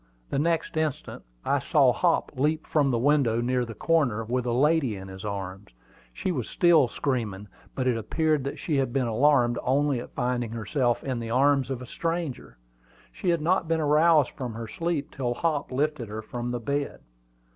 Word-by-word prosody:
The - - 0
next 165 +1 0
instant 155 -3 -2 0.2
I - - +2
saw - - +3
Hop - - +1
leap 150 +4 0
from 145 -3 +2
the 120 - +1
window 130 -3 +2
near 125 +1 0
the 115 -1 -8
corner 140 -10 +1
with 125 +2 -1
a - - +1
lady 140 -1 +2
in 95 0 -8
his 95 0 -9
arms. 100 -1 -5 0.4
She 180 - -3
was 130 -9 -3
still 165 -6 +4
screaming; 110 -8 -3 0.3
but 130 - -1
it 125 -2 +2
appeared 150 +6 0
that 140 - -4
she 155 -4 -1
had 130 -3 0
been 135 -2 +1
alarmed 120 0 +3
only 140 0 +1
at - - -10
finding 125 -1 -1
herself 120 +2 0
in 130 -3 -2
the 115 -1 -5
arms 135 +3 +3
of 130 -2 -4
a - - -7
stranger. 165 - -4 0.5
She 185 - -3
had 170 -2 +2
not 170 +1 +1
been 165 0 +1
aroused 155 -1 +4
from 125 -4 -6
her 115 0 -6
sleep 165 +3 -3
till 120 -2 -2
Hop 150 -1 -1
lifted 140 -2 -1
her 110 +1 -6
from 120 +2 -5
the 120 0 -2
bed. 140 +4 -3
130 Hz, 190 wpm, -26 LUFS, 120-150 Hz, 0.5 s, still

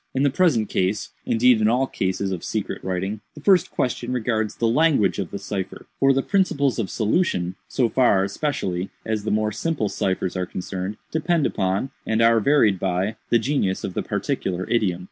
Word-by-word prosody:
"In 135 - +2
the 140 - +3
present 135 - +2
case—indeed 110 +5 +1
in 105 - +4
all 125 +4 +3
cases 95 -4 -2
of 90 -3 -4
secret 110 -3 -3
writing—the 95 +9 -4
first 185 +2 +4
question 125 0 -2
regards 110 -3 -1
the 115 - 0
language 130 -6 +3
of 95 -4 -3
the - - -5
cipher; 100 -1 -5
for 135 0 +5
the 135 0 +1
principles 150 -10 +1
of 105 - -1
solution, 105 - 0
so 125 -3 +1
far, 115 -6 +3
especially, 100 - -2 0.2
as 110 -2 -2
the - - 0
more 105 0 +1
simple 115 -1 -1
ciphers 95 -1 -1
are 90 -1 -2
concerned, 95 +2 -5
depend 160 -1 +1
upon, 95 +8 -1
and 110 0 0
are 115 0 +5
varied 110 -6 +3
by, 95 +4 -1
the 120 - +5
genius 115 -6 0
of 95 - -4
the - - -1
particular 95 0 -2
idiom. 100 -7 +1
110 Hz, 180 wpm, -23 LUFS, 95-135 Hz, 0.2 s, for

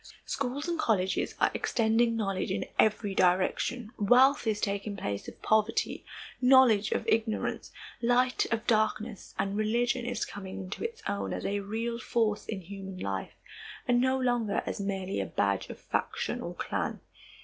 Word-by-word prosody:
Schools 280 +3 -2
and 340 -1 -1
colleges 190 -7 +1
are - - +3
extending 230 0 +2
knowledge 195 -4 -1
in 190 - -1
every 210 -2 +3
direction. 190 +6 +1
Wealth 250 +5 +5
is 215 -1 +1
taking 200 0 -2
place 100 - -4
of - - -10
poverty, 220 +1 +1 0.4
knowledge 250 -5 +6
of - - -1
ignorance, 220 -1 0 0.3
light 250 +1 +2
of 230 0 -1
darkness, 215 -1 0
and 195 +1 -1
religion 235 +4 +1
is 245 - -1
coming 190 -2 -7
into 190 +1 -6
its 460 -1 -5
own 200 - -2
as - - -4
a 205 +1 0
real 225 +4 -3
force 220 -2 0
in 205 -3 -4
human 195 +1 -8
life 95 - -4 0.5
and 245 -1 +4
no 260 +1 +2
longer 240 -5 +1
as - - -3
merely 195 - -2
a - - -2
badge 100 +3 0
of - - -8
faction - - -2
or - - -5
clan. - - -2
215 Hz, 160 wpm, -29 LUFS, 195-245 Hz, 0.5 s, knowledge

